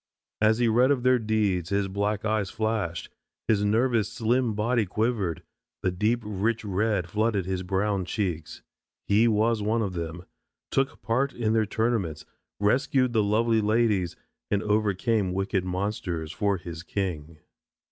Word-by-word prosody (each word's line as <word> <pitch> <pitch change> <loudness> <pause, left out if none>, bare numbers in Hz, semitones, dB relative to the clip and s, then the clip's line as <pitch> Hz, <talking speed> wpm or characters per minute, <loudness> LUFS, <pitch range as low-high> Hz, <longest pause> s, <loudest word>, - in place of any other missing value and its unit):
As 110 0 +4
he 120 -1 +2
read 120 +4 +4
of 135 -4 +1
their 125 0 +4
deeds 105 -6 0
his 100 -1 +1
black 100 +2 -1
eyes 105 -3 0
flashed, 110 -6 -2 0.4
his 105 -2 +2
nervous 115 +1 +2
slim 120 0 +1
body 115 +2 +1
quivered, 105 -3 -1 0.4
the 90 - +2
deep 110 +6 0
rich 105 +2 -1
red 100 -2 0
flooded 105 0 0
his 95 0 -2
brown 95 +1 0
cheeks. 85 -5 -3 0.4
He 105 +3 +4
was 110 0 +2
one 110 +2 +1
of 95 -3 -3
them, 85 +1 -5 0.5
took 135 0 0
part 130 +5 0
in 110 -2 0
their 110 -2 +2
tournaments, 110 -9 -1 0.3
rescued 130 +4 +2
the 110 - +3
lovely 110 +2 +2
ladies 105 -5 +1 0.3
and 100 0 0
overcame 105 -1 +1
wicked 95 0 0
monsters 90 -4 -3
for 100 +2 0
his 85 -2 -8
king. 85 -5 -4
105 Hz, 145 wpm, -26 LUFS, 95-115 Hz, 0.5 s, As